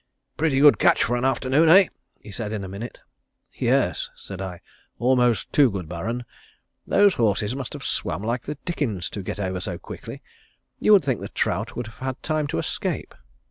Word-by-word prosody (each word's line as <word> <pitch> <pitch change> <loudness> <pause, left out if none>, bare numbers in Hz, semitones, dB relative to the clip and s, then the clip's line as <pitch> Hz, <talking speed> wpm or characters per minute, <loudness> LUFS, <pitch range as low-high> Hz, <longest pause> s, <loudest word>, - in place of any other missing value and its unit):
"Pretty 150 -4 +1
good 145 0 +7
catch - - +4
for 120 - 0
an 120 - -1
afternoon, 135 +4 +3
eh?" 190 +2 +7 0.3
he 105 - -12
said 105 +1 -4
in 105 -2 -3
a - - -5
minute. 100 +6 -7 0.5
"Yes," - - +1
said 95 -1 -9
I. 90 -2 -5 0.4
"Almost 125 -2 +2
too 140 -4 +6
good, 95 -6 -5
Baron. 110 +9 -4 0.6
Those 205 -1 +5
horses 110 - +1
must 135 -2 -5
have - - -7
swam 95 - -2
like 120 +2 -1
the 150 +2 -6
dickens 120 - -2
to 100 - -5
get 95 - -5
over 95 -2 -2
so 90 -2 -4
quickly. - - -9 0.6
You 215 - +5
would 195 - +6
think 130 -6 0
the - - -6
trout - - -1
would 120 - -3
have 110 - -13
had 130 0 -4
time 155 -2 0
to - - -3
escape." - - -3
120 Hz, 190 wpm, -24 LUFS, 100-140 Hz, 0.6 s, good